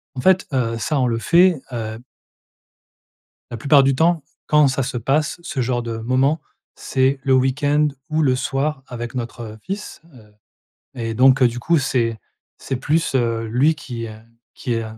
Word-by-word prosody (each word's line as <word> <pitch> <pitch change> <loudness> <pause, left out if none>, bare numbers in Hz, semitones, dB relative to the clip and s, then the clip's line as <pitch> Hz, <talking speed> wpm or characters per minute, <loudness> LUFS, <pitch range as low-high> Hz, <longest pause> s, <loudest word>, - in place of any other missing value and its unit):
En 125 - -4
fait, 190 +5 +3
heu, 115 -3 0
ça 140 +6 -1
on 125 - +2
le 115 -1 -1
fait, 175 +2 +4
heu 110 -2 -5 1.5
la 120 - -4
plupart 140 +4 +5
du 135 0 +2
temps, 165 +1 +2 0.2
quand 150 -1 +5
ça 135 +1 0
se 125 0 -3
passe, 140 +8 0
ce 135 -6 -3
genre 120 0 0
de 115 -1 -5
moment, 130 +6 +1 0.3
c'est 135 +1 0
le 135 - +2
week-end 145 +3 +2 0.2
ou 155 +1 +1
le 130 -4 +3
soir 135 +2 -2
avec 120 0 -6
notre 115 -2 -6
fils. 200 +2 -6
Heu, 110 -4 -17 0.6
et 115 -2 -4
donc, 130 +3 +5
heu, 125 - +7
du 120 +1 -5
coup 165 +7 +2
c'est 115 -4 0 0.4
c'est 135 - -4
plus, 150 +4 0
heu, 115 -2 0
lui 135 +8 +3
qui, 120 -6 -6
heu, 110 - -8 0.4
qui 120 - -3
est, 115 - -1
130 Hz, 175 wpm, -21 LUFS, 115-145 Hz, 1.5 s, heu